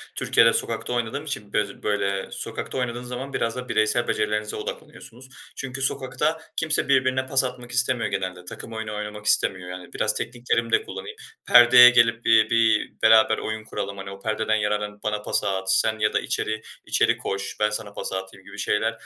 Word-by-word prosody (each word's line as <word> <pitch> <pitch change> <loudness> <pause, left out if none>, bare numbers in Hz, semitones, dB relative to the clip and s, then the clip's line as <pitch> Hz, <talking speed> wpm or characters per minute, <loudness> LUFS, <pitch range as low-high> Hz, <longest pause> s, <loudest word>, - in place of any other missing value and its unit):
Türkiye'de - - +4
sokakta - - -2
oynadığım 120 +4 -2
için 135 -9 -6
böz 105 -1 -2
böyle, 100 -2 -1
sokakta - - -6
oynadığın 125 -1 -3
zaman 125 +3 -6
biraz 115 0 -1
da 125 0 -7
bireysel 110 +2 +1
becerilerinize 105 0 -1
odaklanıyorsunuz. 125 +3 -9 0.3
Çünkü 135 0 -6
sokakta 150 +4 -1
kimse 160 -1 0
birbirine 130 -1 +2
pas 135 0 +2
atmak 125 -1 -6
istemiyor 125 -2 0
genelde, 90 -1 -4
takım 115 +5 -9
oyunu 110 -1 -5
oynamak 105 0 -6
istemiyor. 95 -3 +1
Yani 90 0 -9
"Biraz - - 0
tekniklerimi 120 -1 -2
de - - +3
kullanayım, 95 0 -8 0.3
perdeye 125 0 +9
gelip 115 -1 +3
bi 110 -1 +5
bir 115 -2 +2
beraber 110 0 +5
oyun 110 0 -4
kuralım, 100 -2 -5
hani, 95 0 -7
o 100 - -10
perdeden 110 +1 0
yararlanıp 105 -1 -2
bana 105 -1 -1
pası 105 - -1
at 95 0 0
sen 110 -1 +1
ya 105 0 +1
da - - +2
içeri 110 0 -3 0.2
içeri - - +2
koş 100 0 -4
ben 105 0 +3
sana 105 -1 -5
pası 95 - -4
atayım." 95 0 -9
gibi - - -12
şeyler, 110 +2 +1
110 Hz, 180 wpm, -24 LUFS, 105-125 Hz, 0.3 s, perdeye